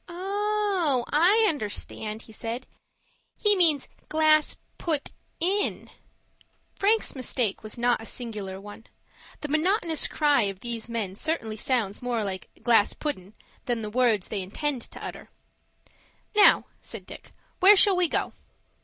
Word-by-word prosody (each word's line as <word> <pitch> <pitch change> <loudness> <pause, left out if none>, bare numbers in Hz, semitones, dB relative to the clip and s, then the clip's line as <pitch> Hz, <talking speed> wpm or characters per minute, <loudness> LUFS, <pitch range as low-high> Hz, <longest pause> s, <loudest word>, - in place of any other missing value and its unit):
"Oh, 385 - 0
I 380 +9 +5
understand," 215 - -3
he - - -15
said. 230 +3 -5 0.7
"He 415 -1 +4
means 320 -7 +3 0.2
'glass 310 -1 +3 0.2
put 310 -4 -2 0.3
in.'" 395 +4 -1 0.8
Frank's 430 +3 +2
mistake 250 -5 0
was 215 +1 -6
not 240 -1 +1
a 225 - -9
singular 210 -6 -6
one. 205 +2 -12 0.5
The 295 - -4
monotonous 325 +2 +1
cry 295 -4 +2
of 195 -1 -9
these 235 -1 -5
men 215 -5 -3
certainly 225 -5 -2
sounds 220 -3 -1
more 240 -3 -1
like 190 -2 -5
"glass 230 -4 +4
puddin'," 210 -10 -5 0.3
than 240 -2 -1
the 210 - -5
words 230 -5 +2
they 205 -3 -2
intend 255 +8 -3
to - - -9
utter. - - -8 1.1
"Now," 420 - +6
said - - -9
Dick, - - -11 0.3
"where 395 +3 +8
shall 395 0 +5
we 360 -1 +3
go?" - - -1
255 Hz, 135 wpm, -26 LUFS, 220-340 Hz, 1.1 s, where